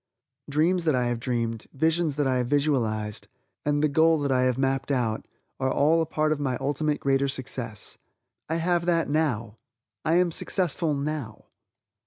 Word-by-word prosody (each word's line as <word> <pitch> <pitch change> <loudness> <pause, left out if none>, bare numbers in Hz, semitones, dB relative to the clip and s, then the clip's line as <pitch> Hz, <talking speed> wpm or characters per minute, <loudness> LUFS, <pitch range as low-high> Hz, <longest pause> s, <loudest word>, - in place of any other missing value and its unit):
Dreams 165 +4 +2
that 155 -4 +3
I 125 -1 +1
have 120 -1 -1
dreamed, 115 -2 -2
visions 160 +1 +1
that 145 -1 0
I 130 -1 +1
have 125 - -1
visualized, 115 -7 0 0.4
and 145 0 +1
the - - +5
goal 160 +2 +4
that 140 -1 0
I 130 -1 +3
have 130 -1 +1
mapped 135 0 0
out, 120 -5 -1 0.3
are 130 0 +1
all 155 +5 +3
a 160 - -1
part 155 0 0
of 155 - 0
my 130 -3 -1
ultimate 145 +2 -1
greater 135 0 +1
success. 125 -5 -2 0.5
I 160 - 0
have 170 +1 0
that 165 -2 +2
now! 115 -8 -1 0.4
I 160 - +2
am 180 -1 +3
successful 165 -3 0
now! 140 -6 -4
140 Hz, 175 wpm, -26 LUFS, 125-160 Hz, 0.5 s, the